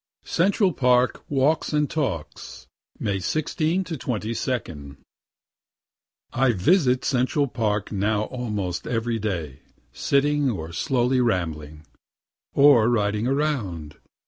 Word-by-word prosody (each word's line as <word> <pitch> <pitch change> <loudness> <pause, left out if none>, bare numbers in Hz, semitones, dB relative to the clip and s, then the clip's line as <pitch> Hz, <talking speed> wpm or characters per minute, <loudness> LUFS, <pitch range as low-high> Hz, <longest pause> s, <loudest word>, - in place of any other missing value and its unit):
CENTRAL 190 +1 +2
PARK 125 -2 +2
WALKS 145 +3 +1
AND 150 -1 +2
TALKS 85 - -4 0.3
May 100 -2 -2
16 155 - -1
to 175 -3 -5
22. 110 - -4 1.4
I 135 0 +3
visit 125 - +2
Central 130 +3 +1
Park 105 -4 -2
now 105 +1 0
almost 105 -8 -4
every 115 -1 -1
day, 85 -10 -4 0.3
sitting, 145 0 +1
or 85 -8 -4
slowly 125 +6 +1
rambling, 80 -8 -2 0.7
or 140 -5 +6
riding 105 -1 0
around. 115 - -2
120 Hz, 100 wpm, -24 LUFS, 95-140 Hz, 1.4 s, or